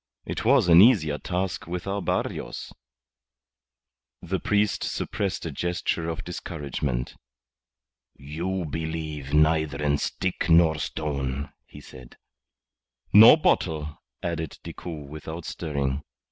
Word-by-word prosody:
It -, -, -4 dB
was 125 Hz, -4 st, +4 dB
an 85 Hz, +1 st, +8 dB
easier 85 Hz, -, +4 dB
task 90 Hz, +3 st, -3 dB
with 90 Hz, +1 st, -4 dB
our 100 Hz, +1 st, -2 dB
Barrios." -, -, -3 dB, 1.5 s
The 90 Hz, +2 st, -2 dB
priest 105 Hz, +3 st, +1 dB
suppressed 95 Hz, -5 st, -3 dB
a 80 Hz, -, -3 dB
gesture 85 Hz, +1 st, -2 dB
of 80 Hz, -, -4 dB
discouragement. 70 Hz, -7 st, -4 dB, 1.0 s
"You 85 Hz, +6 st, -4 dB
believe 80 Hz, -2 st, -4 dB
neither 75 Hz, -1 st, +3 dB
in 75 Hz, -1 st, +1 dB
stick 90 Hz, -1 st, -2 dB
nor 80 Hz, -2 st, +5 dB
stone," 70 Hz, -2 st, -3 dB, 0.2 s
he -, -, -12 dB
said. 65 Hz, -2 st, -14 dB, 1.0 s
"Nor 110 Hz, +9 st, +10 dB
bottle," 80 Hz, -, 0 dB, 0.2 s
added 80 Hz, -3 st, -3 dB
Decoud 80 Hz, -5 st, -7 dB
without 80 Hz, +3 st, -7 dB
stirring. 70 Hz, -3 st, -2 dB
80 Hz, 110 wpm, -26 LUFS, 75-90 Hz, 1.5 s, Nor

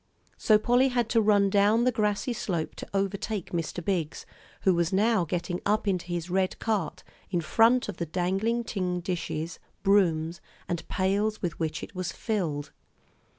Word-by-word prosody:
So 215 Hz, -, +4 dB
Polly 245 Hz, +4 st, +3 dB
had 240 Hz, -3 st, 0 dB
to 230 Hz, -, +4 dB
run 205 Hz, -2 st, +4 dB
down 210 Hz, +4 st, +4 dB
the 255 Hz, -, +3 dB
grassy 215 Hz, +2 st, 0 dB
slope 180 Hz, -8 st, -2 dB
to -, -, -8 dB
overtake 200 Hz, 0 st, -2 dB
Mr. 170 Hz, 0 st, -3 dB
Biggs, 170 Hz, -6 st, -2 dB, 0.4 s
who 190 Hz, -, +4 dB
was 170 Hz, -1 st, +1 dB
now 205 Hz, -1 st, +3 dB
getting 175 Hz, +2 st, -3 dB
up 210 Hz, +1 st, +1 dB
into 180 Hz, -3 st, 0 dB
his 175 Hz, -1 st, -3 dB
red 185 Hz, +1 st, 0 dB
cart, 190 Hz, -6 st, -2 dB, 0.3 s
in 175 Hz, -, 0 dB
front 230 Hz, +9 st, +3 dB
of 210 Hz, -, -5 dB
the 170 Hz, -, -3 dB
dangling 195 Hz, +8 st, 0 dB
tin 180 Hz, -5 st, -2 dB
dishes, 170 Hz, -2 st, -3 dB, 0.2 s
brooms, 170 Hz, -5 st, +2 dB, 0.3 s
and 170 Hz, -1 st, -3 dB
pails 200 Hz, +3 st, 0 dB
with 170 Hz, -2 st, -2 dB
which 160 Hz, -2 st, -2 dB
it -, -, -8 dB
was 185 Hz, -2 st, -3 dB
filled. 165 Hz, -11 st, -2 dB
190 Hz, 165 wpm, -28 LUFS, 175-215 Hz, 0.4 s, So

